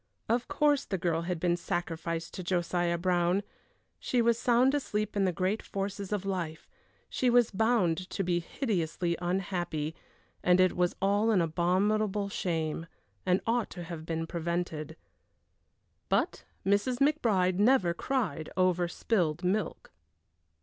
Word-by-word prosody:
Of 235 +2 +1
course 290 -1 +2
the 190 - -2
girl 170 -2 0
had 175 0 -3
been 175 0 +2
sacrificed 170 -2 -3
to - - -5
Josiah 175 -1 0
Brown; 175 +2 +1 0.6
she 250 - 0
was 235 0 +3
sound 250 +2 +4
asleep 215 -8 -1
in 200 -1 +2
the 185 - +2
great 185 +5 -1
forces 200 0 -4
of 205 -2 -1
life; 170 -5 -3 0.4
she 255 - +1
was 240 -1 +4
bound 190 -5 +1
to 195 - -2
be 175 -1 +1
hideously 175 - -1
unhappy, 175 -4 -2 0.5
and 180 0 +4
it 185 0 +4
was 180 0 +1
all 205 +3 +3
an 210 -4 +4
abominable 195 +5 +1
shame, 165 -4 -2 0.4
and 180 +1 +3
ought 235 0 +1
to 175 - -7
have 165 -2 -7
been 165 0 -2
prevented. 165 -2 -3 1.1
But - - 0 0.2
Mrs. 205 +6 +2
McBride 220 -11 +2
never 205 -6 +4
cried 170 - -2
over 180 -1 +3
spilled 175 -4 0
milk. 195 +4 -1
185 Hz, 140 wpm, -30 LUFS, 170-210 Hz, 1.1 s, sound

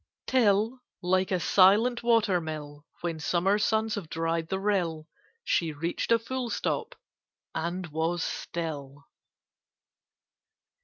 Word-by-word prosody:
Till, 225 0 +2 0.2
like 185 +1 +2
a 185 - +1
silent 205 +8 +4
water 225 -6 +3
mill, 150 -1 -7
When 170 -2 -3
summer 180 +5 +2
suns 220 +1 +1
have 195 -7 -4
dried 165 0 -1
the 190 - -1
rill, 175 -6 0 0.4
She 165 - +1
reached 165 +8 -3
a 230 - +7
full 245 +2 -4
stop, 450 - -2 0.6
and 175 +3 -2
was 160 +2 -1
still. 145 -4 -5
180 Hz, 115 wpm, -28 LUFS, 160-215 Hz, 0.6 s, a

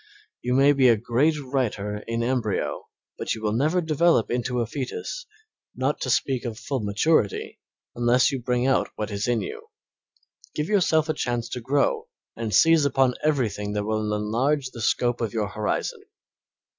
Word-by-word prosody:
You 125 +1 0
may 140 +2 +5
be 135 -2 +4
a 115 -2 +5
great 130 +8 +1
writer 120 -7 -2
in 115 0 -1
embryo, 120 -4 -2 0.3
but - - -1
you 110 - -9
will 105 - +1
never 155 +11 +1
develop 160 -5 +2
into 125 +1 -1
a 120 - +1
fetus, 145 - -5 0.5
not - - -1
to - - -2
speak 130 -3 +1
of 115 -3 -5
full 135 +2 -3
maturity, 105 +2 0 0.3
unless 120 +3 +3
you 135 -2 -3
bring 125 0 0
out 135 0 +2
what 105 0 -4
is 100 +2 -2
in 120 -1 +1
you. 450 +1 -7 0.9
Give 150 +1 -2
yourself 165 -6 +3
a 155 - +1
chance 120 -4 -2
to 125 - -5
grow 140 +4 +1 0.3
and 115 -1 -4
seize 165 +5 +5
upon 135 -2 +3
everything 115 -9 0
that 105 0 -1
will 110 0 -1
enlarge 130 +6 0
the 115 - -8
scope 120 +3 +1
of 115 -3 -2
your 105 -3 -1
horizon. 105 +1 -2
125 Hz, 170 wpm, -25 LUFS, 110-145 Hz, 0.9 s, may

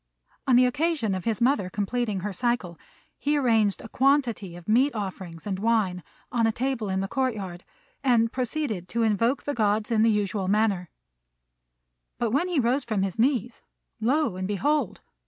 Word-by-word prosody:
On 255 - +5
the 250 +1 +6
occasion 290 - 0
of 185 -1 -4
his 225 -3 0
mother 235 -7 +2
completing 210 0 -2
her 205 +1 -3
cycle, 210 -6 -1 0.4
he 295 +1 +1
arranged 225 -7 +2
a - - -8
quantity 245 -8 +1
of 175 -1 -12
meat 250 +5 +3
offerings 185 -5 -6
and 195 -2 -3
wine 210 -5 +1 0.3
on 230 -2 +2
a - - +2
table 245 -3 -2
in 190 0 0
the 195 - -2
court 260 +2 0
yard, 180 -4 -7 0.4
and 230 -3 +3
proceeded 250 - -3
to 235 0 0
invoke 230 +5 +1
the 290 - -2
Gods 215 -1 +1
in 220 -2 +3
the 225 - +5
usual 205 -2 0
manner; 200 -4 +1 1.3
but 235 -2 -1
when 285 +9 +1
he 350 -5 0
rose 255 +3 +1
from 215 -5 -1
his 195 +1 -3
knees, 240 -2 +1 0.4
lo 260 0 +1
and 185 0 -3
behold! 290 +10 0
225 Hz, 175 wpm, -26 LUFS, 195-255 Hz, 1.3 s, the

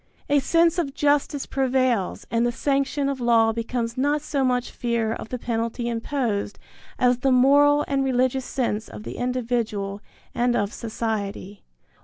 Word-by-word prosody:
A 290 - +5
sense 335 +4 +3
of 280 -5 -2
justice 290 -1 +1
prevails 255 -6 0
and 230 0 +2
the 240 - +1
sanction 275 +2 0
of 275 -2 -3
law 230 -2 +4
becomes 230 +1 -3
not 290 +2 +1
so 285 -3 -1
much 250 -1 0
fear 235 -2 -1
of 225 - -7
the 250 - -3
penalty 230 0 -2
imposed, 230 -3 -2 0.4
as 250 -1 +3
the 270 +1 +2
moral 285 +3 +5
and 275 -1 0
religious 260 0 +1
sense 230 -6 -2
of - - -10
the - - -7
individual 230 -5 -2 0.3
and 240 0 +1
of 205 -2 -1
society. 215 -3 -4
245 Hz, 155 wpm, -24 LUFS, 230-275 Hz, 0.4 s, A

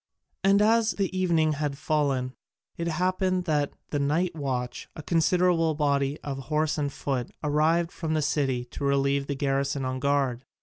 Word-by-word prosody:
And 200 +1 +5
as 220 -3 +2
evening 180 -5 +2
had 145 -1 -2
fallen, 140 -4 0 0.4
it 170 - -3
happened 185 +2 0
that 150 -4 0 0.2
the 145 - 0
night 160 +6 +1
watch, 125 -4 -3
a 155 - -8
considerable 165 0 +2
body 140 -1 0
of 135 -2 -4
horse 155 +3 -1
and 145 -1 -1
foot, 130 -3 -3
arrived 160 +3 +2
from 160 -2 -3
the 155 - +1
city 135 -4 0
to - - -6
relieve 140 0 +1
the 140 - -2
garrison 135 0 -1
on 130 0 -2
guard. 135 -3 0
150 Hz, 160 wpm, -27 LUFS, 140-170 Hz, 0.4 s, And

